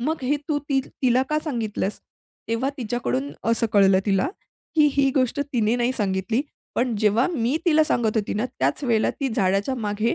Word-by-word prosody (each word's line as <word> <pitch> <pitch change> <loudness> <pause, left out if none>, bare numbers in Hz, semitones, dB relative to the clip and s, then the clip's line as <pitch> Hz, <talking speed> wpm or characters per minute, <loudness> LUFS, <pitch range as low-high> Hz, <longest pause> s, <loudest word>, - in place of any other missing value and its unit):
मग 305 +3 -2
हे 285 +3 +1
तू 295 -1 +1
ति 270 -2 +2 0.2
तिला 255 0 +4
का 305 - +2
सांगितलंस?'." 220 -7 -3 0.5
तेव्हा 240 +5 0
तिच्याकडून 145 - -2 0.2
असं 230 0 +2
कळलं 195 -2 +5
तिला, 195 +4 +2 0.5
की 305 -2 +5
ही 275 -1 +3
गोष्ट 260 +1 +1
तिने 230 0 +2
नाही 245 +1 +1
सांगितली. 205 +2 0 0.3
पण 240 -2 0
जेव्हा 215 +3 +3
मी 250 +2 +1
तिला 315 -2 +5
सांगत 230 -6 0
होती 210 -2 -1
ना 215 +4 0
त्याच 260 +3 -2
वेळेला 230 -4 +2
ती 275 -2 -3
झाडाच्या 200 +2 +1
मागे 215 -1 -1
235 Hz, 180 wpm, -23 LUFS, 210-265 Hz, 0.5 s, कळलं